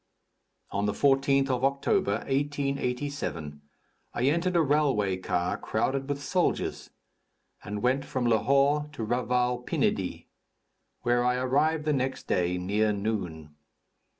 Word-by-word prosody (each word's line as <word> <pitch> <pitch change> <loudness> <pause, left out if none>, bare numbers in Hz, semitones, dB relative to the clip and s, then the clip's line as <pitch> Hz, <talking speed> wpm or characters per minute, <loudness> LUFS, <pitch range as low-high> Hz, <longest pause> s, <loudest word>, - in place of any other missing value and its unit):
On 100 +1 0
the 105 - 0
14th 135 +1 +3
of 125 0 -1
October, 140 -6 +1
1887, 140 - -2 0.5
I 120 - -1
entered 170 +6 +1
a 170 - +5
railway 135 -10 +2
car 90 -1 -1
crowded 135 +5 -1
with 145 0 -3
soldiers, 180 +6 -1 0.7
and 105 0 -5
went 130 +2 +2
from 130 -3 -2
Lahore 140 +6 +3
to 115 - -4
Raval 125 +1 0
Pinidi, - - -1 0.8
where 120 0 +2
I 125 0 +2
arrived 145 +5 +1
the 150 - +2
next 130 -1 -2
day, 90 0 0
near 105 +4 +1
noon. 95 -8 -3
125 Hz, 125 wpm, -28 LUFS, 105-140 Hz, 0.8 s, a